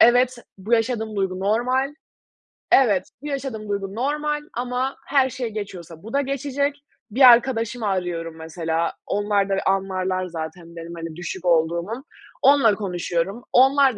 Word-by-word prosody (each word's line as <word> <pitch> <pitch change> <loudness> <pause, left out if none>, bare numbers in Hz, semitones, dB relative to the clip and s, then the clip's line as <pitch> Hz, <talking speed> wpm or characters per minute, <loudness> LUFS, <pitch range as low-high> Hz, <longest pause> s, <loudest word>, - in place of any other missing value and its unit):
Evet, 245 +1 +5 0.2
bu 210 +5 -6
yaşadığım 225 -2 +1
duygu 190 -1 -1
normal. 255 +7 +1 0.8
Evet, 205 -9 +5 0.2
bu 295 - -6
yaşadığım 260 -7 -4
duygu 200 0 -3
normal 295 +4 -1
ama 250 +2 -2
her 270 -2 +3
şey 250 -2 -4
geçiyorsa 185 -5 -7
bu 225 - -9
da 280 - +3
geçecek. 280 +1 -1 0.4
Bir 260 +6 -1
arkadaşımı 235 -2 +2
arıyorum 175 -4 -2
mesela, 165 0 -2
onlar 205 -1 +1
da 195 - +2
anlarlar 190 -1 0
zaten 165 0 -7
benim, 165 0 -8
hani, 165 -1 -6
düşük 175 +1 -6
olduğumu, 170 - +1 0.4
onunla 270 -7 +5
konuşuyorum. 185 +2 -2
Onlar 270 -1 +5
210 Hz, 135 wpm, -23 LUFS, 180-255 Hz, 0.8 s, Evet